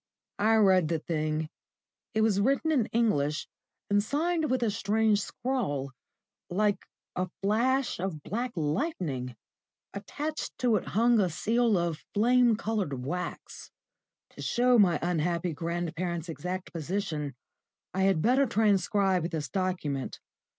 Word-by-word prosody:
I 220 Hz, +2 st, +4 dB
read 190 Hz, -6 st, +5 dB
the 165 Hz, +1 st, 0 dB
thing. 155 Hz, -1 st, -2 dB, 0.7 s
It 220 Hz, -, +3 dB
was 210 Hz, -3 st, +3 dB
written 275 Hz, +7 st, +2 dB
in 255 Hz, -8 st, +2 dB
English, 155 Hz, -11 st, +1 dB, 0.4 s
and 205 Hz, 0 st, +3 dB
signed 315 Hz, +5 st, 0 dB
with 255 Hz, -1 st, +1 dB
a 220 Hz, -, +1 dB
strange 210 Hz, +1 st, +2 dB
scrawl, 200 Hz, -, -2 dB, 0.6 s
like 205 Hz, +3 st, 0 dB, 0.3 s
a 185 Hz, 0 st, -1 dB
flash 245 Hz, +5 st, +1 dB
of 170 Hz, -5 st, -4 dB
black 240 Hz, +4 st, -3 dB
lightning. 150 Hz, -, -2 dB, 0.6 s
Attached 295 Hz, +10 st, -5 dB
to 245 Hz, -3 st, +2 dB
it -, -, -5 dB
hung 235 Hz, 0 st, +5 dB
a 190 Hz, -3 st, +2 dB
seal 225 Hz, +6 st, +1 dB
of 170 Hz, -2 st, -2 dB
flame 240 Hz, +2 st, +4 dB
coloured 195 Hz, -, -2 dB
wax. 180 Hz, +5 st, -5 dB, 0.6 s
To -, -, -11 dB
show 245 Hz, 0 st, +3 dB
my 185 Hz, -4 st, +5 dB
unhappy 170 Hz, 0 st, 0 dB
grandparent's 170 Hz, +1 st, -3 dB
exact 180 Hz, +3 st, -5 dB
position 160 Hz, -4 st, -3 dB, 0.6 s
I 190 Hz, -, -1 dB
had 190 Hz, -5 st, +3 dB
better 260 Hz, +3 st, +4 dB
transcribe 200 Hz, -4 st, +2 dB
this 160 Hz, -4 st, -4 dB
document. 180 Hz, -8 st, -2 dB
195 Hz, 130 wpm, -29 LUFS, 165-230 Hz, 0.7 s, read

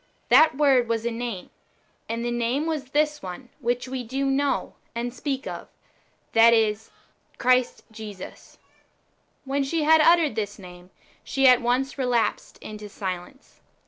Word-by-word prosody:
That 275 Hz, +2 st, +6 dB
w^ord 270 Hz, -5 st, +4 dB
was 230 Hz, 0 st, -1 dB
a 235 Hz, -, 0 dB
name, 230 Hz, -5 st, -5 dB, 0.6 s
and 230 Hz, +1 st, -3 dB
the 240 Hz, -, -1 dB
name 240 Hz, +5 st, -1 dB
was 310 Hz, -4 st, -2 dB
this 300 Hz, +2 st, 0 dB
one 190 Hz, +7 st, -8 dB
which 245 Hz, +2 st, -1 dB
we 255 Hz, -1 st, -4 dB
do 265 Hz, +4 st, -3 dB
know 275 Hz, +1 st, 0 dB, 0.2 s
and 240 Hz, +1 st, -3 dB
speak 270 Hz, +1 st, -4 dB
of, -, -, -7 dB, 0.7 s
viz. 225 Hz, -1 st, +4 dB, 0.5 s
Christ 255 Hz, 0 st, +1 dB
Jesus. 210 Hz, -4 st, -10 dB, 0.9 s
When 275 Hz, +1 st, 0 dB
she 310 Hz, +3 st, -1 dB
had 320 Hz, +1 st, +5 dB
uttered 330 Hz, -4 st, +4 dB
this 205 Hz, -2 st, -4 dB
name, 180 Hz, -2 st, -13 dB, 0.3 s
she 270 Hz, -1 st, +2 dB
at 250 Hz, -1 st, +6 dB
once 255 Hz, +3 st, -1 dB
relapsed 245 Hz, -3 st, -1 dB
into 210 Hz, -1 st, -8 dB
silence. 190 Hz, +6 st, -7 dB
245 Hz, 145 wpm, -25 LUFS, 225-275 Hz, 0.9 s, That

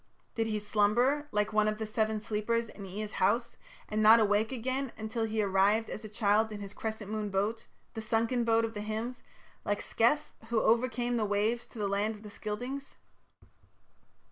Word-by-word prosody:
Did 225 Hz, -1 st, 0 dB
he 215 Hz, -1 st, -1 dB
slumber, 225 Hz, +8 st, +2 dB
like 210 Hz, +1 st, 0 dB
one 215 Hz, 0 st, +3 dB
of 215 Hz, 0 st, 0 dB
the 220 Hz, -, -3 dB
Seven 215 Hz, 0 st, 0 dB
Sleepers, 225 Hz, +2 st, -1 dB
in 200 Hz, -2 st, -9 dB
Ea's 210 Hz, +3 st, -5 dB
house, 235 Hz, +5 st, +1 dB, 0.3 s
and 215 Hz, 0 st, -1 dB
not 220 Hz, +2 st, +8 dB
awake 215 Hz, +1 st, +2 dB
again 260 Hz, +1 st, -2 dB
until 225 Hz, +1 st, -2 dB
he 220 Hz, -1 st, 0 dB
arrived 200 Hz, +3 st, +2 dB
as 215 Hz, -, -6 dB
a 215 Hz, -, -7 dB
child 215 Hz, +1 st, +2 dB
in 210 Hz, -, -6 dB
his 200 Hz, -1 st, -7 dB
crescent 220 Hz, -2 st, -5 dB
moon 215 Hz, -1 st, -2 dB
boat 205 Hz, +4 st, -1 dB, 0.3 s
"the 220 Hz, -, -5 dB
sunken 230 Hz, +2 st, +1 dB
boat" 230 Hz, 0 st, +3 dB
of 225 Hz, -, -5 dB
the 205 Hz, -, -5 dB
hymns 220 Hz, +4 st, -4 dB, 0.4 s
like 205 Hz, 0 st, -1 dB
Scef, 240 Hz, +7 st, +1 dB, 0.2 s
who 235 Hz, -, 0 dB, 0.3 s
came 240 Hz, +1 st, -2 dB
over -, -, +1 dB
the 215 Hz, -3 st, 0 dB
waves 215 Hz, +4 st, 0 dB
to -, -, -14 dB
the 205 Hz, -2 st, -1 dB
land 205 Hz, +2 st, 0 dB
of 210 Hz, -, -14 dB
the 210 Hz, -, -9 dB
Scyldings? 245 Hz, +7 st, -5 dB
220 Hz, 195 wpm, -31 LUFS, 210-230 Hz, 0.4 s, not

